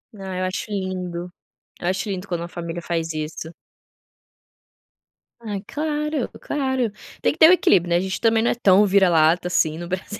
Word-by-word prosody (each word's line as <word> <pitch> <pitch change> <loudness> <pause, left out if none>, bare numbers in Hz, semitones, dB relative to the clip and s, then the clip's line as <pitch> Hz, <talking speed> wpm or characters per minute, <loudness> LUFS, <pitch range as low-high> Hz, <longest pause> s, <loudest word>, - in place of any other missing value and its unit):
Ah, 190 -2 -6
eu 185 - -1
acho 185 +3 -4
lindo, 180 -3 -4 0.5
eu 175 - -3
acho 190 +3 -1
lindo 190 0 -4
quando 175 -2 -3
uma 170 - -5
família 170 0 -6
faz 165 -1 -2
isso. 155 +1 -5 1.9
Ai, 205 -4 -5
claro, 300 -2 -2
claro. 265 -5 -1 0.3
Tem - - +3
que - - -15
ter 320 +1 +8
o - - +8
equilíbrio, 180 - +3
né, 170 - +3
a - - +2
gente 190 0 -3
também 225 -1 +3
não 235 - +2
é - - -1
tão 200 -3 +5
vira-lata 175 -3 +4
assim 160 -3 +1
no 175 0 -6
Brasil, 185 +3 -5
185 Hz, 185 wpm, -22 LUFS, 175-215 Hz, 1.9 s, ter